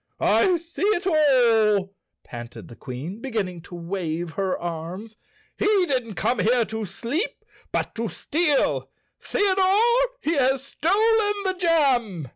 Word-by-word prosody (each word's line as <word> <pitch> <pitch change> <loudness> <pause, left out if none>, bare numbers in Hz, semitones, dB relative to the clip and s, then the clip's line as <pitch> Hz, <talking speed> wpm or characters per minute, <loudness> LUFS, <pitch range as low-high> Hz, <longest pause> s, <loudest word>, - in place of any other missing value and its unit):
"I 375 -3 +3
see 335 0 -8
it 395 -2 +1
all," 230 - +3 0.3
panted 120 0 -10
the 120 - -11
Queen 145 - -7
beginning 205 -9 -3
to 175 - -11
wave 170 -1 -4
her 190 0 -2
arms. 175 +6 -6 0.4
"He - - +1 0.2
didn't 250 - -2
come 245 - 0
here 235 +1 +3
to 220 0 -5
sleep 245 - -3 0.3
but - - -2
to 230 -1 -3
steal! 305 -2 0 0.3
Theodore, 385 -1 +2 0.4
he 330 -8 -1
has 265 -2 +2
stolen 415 +9 +2
the 380 -1 0
jam!" 260 - +1
235 Hz, 130 wpm, -24 LUFS, -, 0.4 s, I